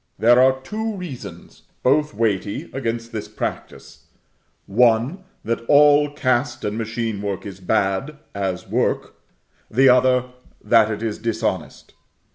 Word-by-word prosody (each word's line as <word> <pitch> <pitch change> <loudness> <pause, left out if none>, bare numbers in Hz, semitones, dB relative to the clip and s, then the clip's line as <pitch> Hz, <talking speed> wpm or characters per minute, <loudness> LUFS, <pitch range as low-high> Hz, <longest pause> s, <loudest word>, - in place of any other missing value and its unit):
There 120 +2 +5
are 130 0 +4
two 220 +9 -4
reasons, 175 -10 -9 0.2
both 150 -1 +2
weighty, 105 -2 -2
against 115 -3 -3
this 110 -3 -5
practice; - - -7 0.6
one, 120 - +2 0.2
that 115 +1 -2
all 145 0 +5
cast 130 -4 -1
and 105 0 -2
machine 115 -2 -3
work 100 -2 -4
is 95 -2 -8
bad, 95 +10 -1 0.2
as 95 -3 -3
work; - - -1 0.5
the 130 +4 +4
other, 125 0 +4 0.4
that 115 -2 +4
it 110 0 -4
is 110 -2 -3
dishonest. 110 -7 -3
115 Hz, 125 wpm, -21 LUFS, 105-135 Hz, 0.6 s, There